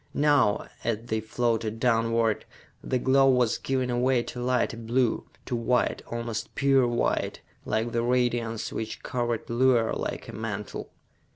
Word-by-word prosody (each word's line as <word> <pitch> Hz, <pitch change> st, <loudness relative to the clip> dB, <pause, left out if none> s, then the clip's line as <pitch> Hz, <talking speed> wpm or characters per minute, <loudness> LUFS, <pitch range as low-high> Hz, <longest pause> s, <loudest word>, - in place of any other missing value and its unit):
Now, 145 Hz, -8 st, +3 dB, 0.2 s
as 115 Hz, -2 st, 0 dB
they 110 Hz, -2 st, -1 dB
floated 115 Hz, 0 st, -1 dB
downward, 115 Hz, -2 st, +2 dB, 0.4 s
the 130 Hz, -, 0 dB
glow 135 Hz, +2 st, +4 dB
was 125 Hz, -3 st, +2 dB
giving 130 Hz, -2 st, -1 dB
away 125 Hz, 0 st, +2 dB
to 125 Hz, -, -6 dB
lighter 125 Hz, -1 st, +1 dB
blue, 115 Hz, +1 st, 0 dB, 0.2 s
to 125 Hz, -, -2 dB
white, 120 Hz, +1 st, +1 dB
almost 115 Hz, -1 st, -4 dB
pure 135 Hz, -2 st, +4 dB
white, 120 Hz, 0 st, 0 dB, 0.2 s
like 110 Hz, +2 st, -1 dB
the 115 Hz, -, 0 dB
radiance 120 Hz, -2 st, 0 dB
which 110 Hz, 0 st, -5 dB
covered 120 Hz, -2 st, -2 dB
Luar 120 Hz, -1 st, +3 dB
like -, -, -4 dB
a -, -, -8 dB
mantle. 105 Hz, -2 st, -5 dB
120 Hz, 145 wpm, -27 LUFS, 115-125 Hz, 0.4 s, glow